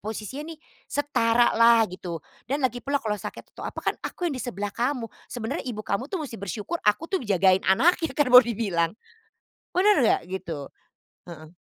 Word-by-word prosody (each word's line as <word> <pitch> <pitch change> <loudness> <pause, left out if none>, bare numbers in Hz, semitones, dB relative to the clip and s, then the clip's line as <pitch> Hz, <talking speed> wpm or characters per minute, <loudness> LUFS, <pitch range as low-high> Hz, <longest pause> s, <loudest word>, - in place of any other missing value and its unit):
posisinya 240 +9 -6
nih 315 - -13 0.3
setara 240 -5 +2
lah 230 -1 +6
gitu. 180 -2 -6 0.3
"Dan 280 0 -1
lagi 245 -1 -1
pula 280 +1 +1
kalau 215 -5 -2
sakit - - -9
atau - - -10
apa - - -6
kan - - +1
aku 355 - -3
yang 285 - -4
di 255 - -4
sebelah 205 -3 -4
kamu, 245 -1 -1 0.2
sebenarnya 230 -1 -4
ibu 215 -2 -5
kamu 240 +8 -2
tuh 380 - -2
mesti 235 - -7
bersyukur, 210 - -4
aku 210 +9 +2
tuh 380 - 0
ngejagain 190 -3 +3
anaknya" 325 - +3
kan 295 - +3
mau 250 +1 +11
dibilang, 200 -8 0 0.9
benar 410 +3 +5
nggak, 230 - +3
gitu? 165 -7 -5 0.6
Heeh. 155 -2 -10
230 Hz, 180 wpm, -25 LUFS, 200-280 Hz, 0.9 s, mau